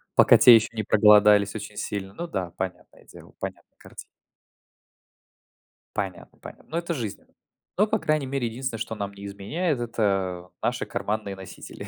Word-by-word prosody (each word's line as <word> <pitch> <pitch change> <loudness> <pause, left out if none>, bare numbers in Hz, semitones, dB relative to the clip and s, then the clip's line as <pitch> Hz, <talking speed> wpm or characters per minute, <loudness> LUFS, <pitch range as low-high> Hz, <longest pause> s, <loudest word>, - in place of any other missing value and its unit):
пока - - +7
те 120 - +9
еще 110 0 +3
не 110 - -2
проголодались 105 -1 +5
очень 105 -1 -7
сильно. 95 -2 -4
Ну 170 +10 -6
да, 95 - -4
понятное 95 -1 -7
дело, - - -15
понятная - - -8
картина. - - -16 2.0
Понятно, 95 -4 -5
понятно. - - -12
Ну, 160 - -3
это 170 0 -2
жизнь. 115 -9 -5 0.6
Но, 210 +3 +4
по 220 +1 0
крайней 155 -5 0
мере, 130 -2 -2
единственное, 120 0 -4
что 110 - -4
нам 100 -1 -4
не 100 0 -10
изменяет- 125 - -2
это, 95 -6 -1
э, - - -56
наши - - -1
карманные 105 -2 -3
носители. 95 -1 -10
105 Hz, 160 wpm, -25 LUFS, 100-130 Hz, 2.0 s, те